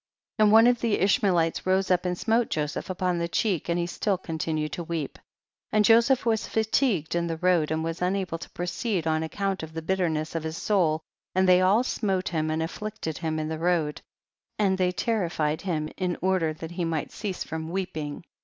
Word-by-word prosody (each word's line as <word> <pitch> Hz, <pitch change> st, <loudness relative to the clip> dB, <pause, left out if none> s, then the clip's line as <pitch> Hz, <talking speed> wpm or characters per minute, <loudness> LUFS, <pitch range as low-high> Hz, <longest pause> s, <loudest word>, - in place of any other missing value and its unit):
27. 215 Hz, -, +6 dB
And -, -, +4 dB
one 225 Hz, +1 st, +8 dB
of 245 Hz, -1 st, +3 dB
the 230 Hz, -3 st, +1 dB
Ishmaelites 180 Hz, -4 st, +2 dB
rose 190 Hz, +1 st, +2 dB
vip 180 Hz, 0 st, +2 dB
and 180 Hz, 0 st, -1 dB
smote 225 Hz, +3 st, +1 dB
Joseph 150 Hz, +3 st, -2 dB
upon 180 Hz, -1 st, 0 dB
the 170 Hz, -, -1 dB
cheek, 180 Hz, -2 st, 0 dB
and 170 Hz, 0 st, 0 dB
still 195 Hz, +2 st, -1 dB
he 185 Hz, -, -23 dB
continued 155 Hz, -1 st, -2 dB
to 175 Hz, -, -4 dB
weep;. 165 Hz, -4 st, -4 dB, 0.5 s
and 215 Hz, -1 st, +4 dB
Joseph 235 Hz, +4 st, +5 dB
was 225 Hz, -2 st, +1 dB
fatigued 220 Hz, -, +1 dB
in 170 Hz, 0 st, 0 dB
the 165 Hz, -1 st, -3 dB
road^ 175 Hz, -3 st, +2 dB
and 160 Hz, 0 st, -1 dB
was 165 Hz, +1 st, -4 dB
unable 180 Hz, -2 st, -1 dB
to -, -, -9 dB
proceed 180 Hz, +1 st, -2 dB
on 160 Hz, 0 st, +1 dB
account 195 Hz, +4 st, -2 dB
of 160 Hz, 0 st, -8 dB
the 160 Hz, -, -4 dB
bitterness 165 Hz, -4 st, 0 dB
of 165 Hz, -, -2 dB
his 160 Hz, +1 st, -4 dB
soul, 165 Hz, -7 st, +1 dB, 0.3 s
and 190 Hz, 0 st, +3 dB
they 180 Hz, 0 st, +6 dB
all 200 Hz, +6 st, +4 dB
smote 195 Hz, -7 st, -1 dB
him 155 Hz, -3 st, -1 dB
and 160 Hz, +1 st, 0 dB
afflicted 200 Hz, -2 st, -5 dB
him 160 Hz, -2 st, -2 dB
in 155 Hz, 0 st, -2 dB
the 160 Hz, 0 st, -4 dB
road, 165 Hz, -3 st, 0 dB, 0.6 s
and 190 Hz, -2 st, +2 dB
they 180 Hz, -1 st, +2 dB
terrified 175 Hz, -7 st, -1 dB
him 160 Hz, -5 st, -2 dB
in 180 Hz, -2 st, -1 dB
order 185 Hz, -3 st, +1 dB
that 160 Hz, +1 st, -8 dB
he 175 Hz, 0 st, -3 dB
might 165 Hz, -2 st, -2 dB
cease 205 Hz, -3 st, -4 dB
from 160 Hz, 0 st, -5 dB
weeping. 165 Hz, -5 st, -4 dB
175 Hz, 205 wpm, -26 LUFS, 160-195 Hz, 0.6 s, one